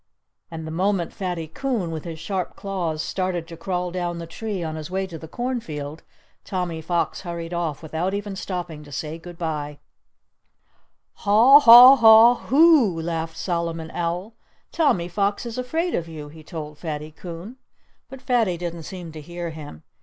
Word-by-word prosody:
And 160 -2 -7
the 160 - -6
moment 185 +1 0
Fatty 180 -5 -4
Coon, 215 - -2
with 160 0 -6
his 165 -2 -6
sharp 185 +1 -3
claws, 175 -6 -3
started 185 -3 -2
to 165 - -9
crawl 180 +1 -3
down 175 -1 -3
the 170 - -6
tree 195 +2 -5
on 160 -1 -4
his 155 0 -7
way 190 +1 -1
to 170 -4 -9
the 160 - -9
cornfield, 160 - -4 0.4
Tommy 180 -4 -3
Fox 170 +1 -1
hurried 170 -1 -6
off 165 -3 -3
without 165 +5 -2
even 205 -1 -4
stopping 175 -5 -5
to 145 - -14
say 155 +3 -5
good 175 +1 -11
bye. 150 -3 -4 1.4
"Haw 230 +8 +7
haw 250 +1 +10
haw 225 0 +8
hoo!" 275 - +5
laughed 165 0 -3
Solomon 165 -2 -3
Owl. 175 +5 -3 0.4
"Tommy 280 - +1
Fox 200 +4 -1
is 235 +1 -5
afraid 325 +8 -1
of 170 - -2
you!" 155 -3 -8
he 155 +1 -13
told 150 -2 -8
Fatty 155 -2 -5
Coon. 175 +8 -9 0.5
But 270 0 -11
Fatty 230 -9 +1
didn't 170 -1 -5
seem 180 -3 -8
to 155 0 -9
hear 175 +2 -6
him. 145 - -10
175 Hz, 170 wpm, -23 LUFS, 160-200 Hz, 1.4 s, haw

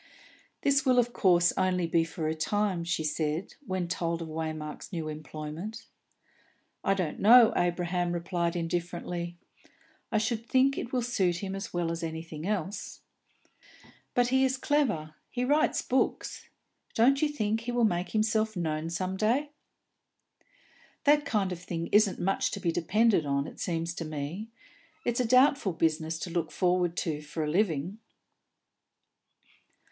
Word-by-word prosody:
"This 275 -1 +3
will 255 -2 +3
of 240 0 +3
course 175 -3 +4
only 185 -2 +1
be 165 0 +2
for 165 -1 -4
a 155 - 0
time?" 190 +2 0
she 170 -1 -1
said, 155 +3 -2
when 185 -2 -1
told 170 -1 -1
of 160 - -8
Waymark's 155 0 -5
new 165 -4 -3
employment. 155 +7 -6 1.0
"I 195 - +2
don't 180 -5 -2
know," 235 +2 +8
Abraham 175 0 0
replied 170 0 -1
indifferently. 175 0 -3 0.7
"I - - +2
should 220 +1 0
think 270 +1 +3
it 235 - -5
will 250 -2 0
suit 190 -7 0
him 190 -1 -3
as 195 0 -5
well 175 -1 -1
as 165 0 -4
anything 160 0 -5
else." 200 -1 -3 1.1
"But 245 0 +3
he 265 +1 +3
is 265 0 +1
clever; 230 - 0 0.2
he 250 0 -2
writes 295 +4 +2
books. 260 - -1 0.5
Don't 265 +4 +4
you 305 - +3
think 220 -6 -1
he 235 +2 -4
will 240 -1 +3
make 175 -3 0
himself 215 -1 +1
known 160 -1 -2
some 185 +2 -2
day?" 250 +8 +1 1.5
"That 295 0 +4
kind 200 -4 0
of 180 - -4
thing 170 -1 -4
isn't 210 -2 +4
much 195 +2 +1
to - - -5
be 170 - 0
depended 190 0 +2
on, 140 0 0
it - - -10
seems 165 -1 -2
to 165 - -5
me. 155 +7 -5 0.6
It's 240 0 0
a 250 - +2
doubtful 255 - +4
business 160 0 0
to 180 - -4
look 165 -2 -1
forward 180 -2 +1
to 155 -3 -2
for 150 +1 -4
a - - -2
living." 180 +1 0
180 Hz, 155 wpm, -29 LUFS, 165-220 Hz, 1.5 s, know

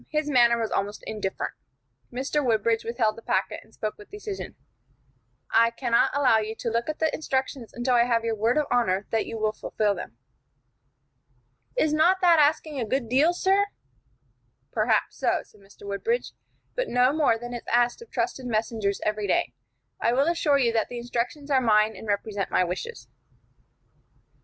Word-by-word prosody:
His 305 -1 -1
manner 240 -3 +5
was 225 -1 -2
almost 205 +1 -2
indifferent. 210 -3 -3 0.6
Mr. 270 +4 -1
Woodbridge 225 -2 +1
withheld 230 -2 0
the 230 - -11
packet, 190 -3 -1
and 220 - -24
spoke 215 -1 -5
with 210 - -13
decision: 415 -1 -7 1.0
"I 230 +1 +6
cannot 235 0 +2
allow 255 -6 +4
you 220 +1 -4
to 230 0 -3
look 235 +4 -1
at 310 - -3
the 315 -1 0
instructions 265 -5 -2
until 245 +1 -1
I 240 -1 +5
have 230 -2 +1
your 230 - 0
word 225 +5 +1
of 300 - +2
honor 200 -5 +1
that 225 - 0
you 225 - -5
will 215 -1 +1
fulfil 215 -1 -1
them." 115 - -8 1.6
"Is 310 -1 +2
not 345 +5 +4
that 345 -3 +6
asking 300 -1 +2
a - - 0
good 235 +1 -2
deal, 280 +7 +4
sir?" 385 +3 +2 1.0
"Perhaps - - +1
so," - - +1
said 210 - -23
Mr. 195 +1 -16
Woodbridge, 325 - -2 0.4
"but - - -2
no 250 +2 +3
more 295 -7 +3
than 240 +1 -7
is 240 - -4
asked 240 - +2
of 470 - -12
trusted 260 -2 -2
messengers 215 -3 -1
every 210 -1 -1
day. - - +1 0.5
I 235 - +2
will 270 +3 +3
assure 330 -4 +2
you 240 -4 +2
that 225 -2 0
the 245 - -6
instructions 245 +5 -3
are 265 -2 +4
mine 215 -2 +3
and 220 - -10
represent 205 -1 -2
my - - +3
wishes." 185 - -5
235 Hz, 175 wpm, -26 LUFS, 220-285 Hz, 1.6 s, I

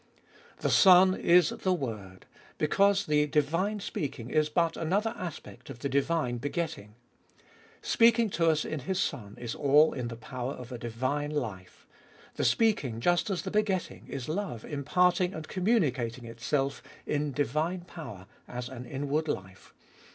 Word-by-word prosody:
4. - - -26
The - - +2
Son 185 -1 +7
is 175 -2 +4
the 185 - -1
Word, 105 - -6 0.3
because 200 +6 +3
the 150 0 +2
divine 165 +9 0
speaking 145 - -5
is 155 -1 +2
but 165 +1 +1
another 200 +8 0
aspect 175 -9 -8
of 135 - -7
the 140 +3 -3
divine 140 -3 0
begetting. 145 - -4 0.9
Speaking 230 0 +4
to 165 -2 +2
us 155 -1 +1
in 155 - -3
His 185 +8 -2
Son 110 - -3
is 120 -2 -4
all 145 +2 +4
in 125 -2 -3
the 115 - -6
power 125 +3 -5
of 125 0 -10
a 125 - -6
divine 130 +6 -2
life. 110 -12 -5 0.5
The - - -2
speaking, 150 - +2
just 175 - +2
as 180 -5 -2
the - - -4
begetting, 210 -4 -1
is 135 -3 -5
love 155 - -3
imparting 180 +5 +1
and 160 0 -7
communicating 135 - 0
itself 135 +4 -2 0.2
in 150 0 -1
divine 155 +7 -1
power 140 - -9 0.2
as 125 0 -6
an 125 -2 -8
inward 145 +3 -2
life. 95 -8 -6
150 Hz, 155 wpm, -29 LUFS, 125-180 Hz, 0.9 s, Son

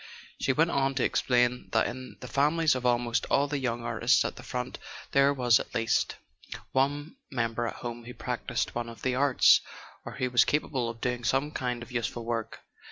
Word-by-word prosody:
She - - +1
went 160 +5 +2
on 135 0 +1
to 135 - +1
explain 125 0 +1
that - - +3
in 130 0 -6
the 125 - -7
families 155 +4 +2
of 125 -1 -1
almost 120 -2 +1
all 140 +1 +3
the 145 0 -2
young 120 -3 -2
artists 115 +1 +2
at - - -3
the - - -10
front 125 0 -5 0.3
there 140 0 +5
was 125 -4 +4
at - - -8
least 115 -1 +1 0.6
one 145 - 0
member 115 -2 -1
at - - -5
home 120 -1 -7
who 125 - -8
practised - - -3
one 120 0 -3
of 115 - -12
the 130 - +1
arts, 135 0 +5 0.4
or - - -7
who 125 -1 -2
was 120 - +6
capable 135 -5 -1
of 115 0 -8
doing 125 -1 -2
some 135 +6 +1
kind 125 -4 -3
of 120 - -13
useful 120 -1 -3
work. 115 -1 -3
125 Hz, 200 wpm, -28 LUFS, 120-135 Hz, 0.6 s, was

